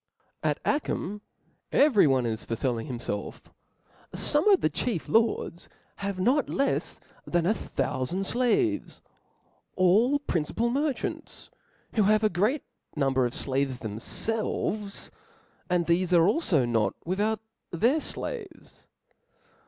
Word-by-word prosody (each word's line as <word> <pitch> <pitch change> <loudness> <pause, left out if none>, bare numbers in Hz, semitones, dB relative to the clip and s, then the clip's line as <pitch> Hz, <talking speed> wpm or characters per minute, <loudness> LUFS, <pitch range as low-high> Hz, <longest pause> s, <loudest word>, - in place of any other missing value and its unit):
At - - 0
Achim 210 - -1 0.5
every 255 - +5
one 130 -3 +2
is 110 -2 -2
for 115 - -3
felling 120 +1 -2
himfelf. 120 -6 -5 0.6
Some 300 +8 +3
of 390 -3 +5
the - - +2
chief 175 +2 -2
lords 225 -6 +1
(^) - - -25 0.3
have 200 -1 -4
not 260 +9 +2
Icfs 275 - -1 0.3
than 175 -1 +1
a 205 - +3
thoufand(0 135 - -3
!>»»»• 195 - -1
flaves, 300 +6 0 0.7
all 210 +10 +4
principal 230 - -1
merchants, 285 +1 -3 0.4
who 220 - +2
have 215 +2 +3
a 215 - +4
great 210 +11 0
voyages^ - - -28
number 135 -3 +2
of 120 - -8
flaves 135 -1 0
themfelves, 200 - -2 0.6
and 175 -1 +2
thefc 175 +2 +1
alfo 170 +5 +4 0.3
atc^^^*^' 120 - 0
not 115 -3 +1
without 205 +5 0 0.3
their 235 - +2
flaves. 440 +6 -6
195 Hz, 130 wpm, -27 LUFS, -, 0.7 s, every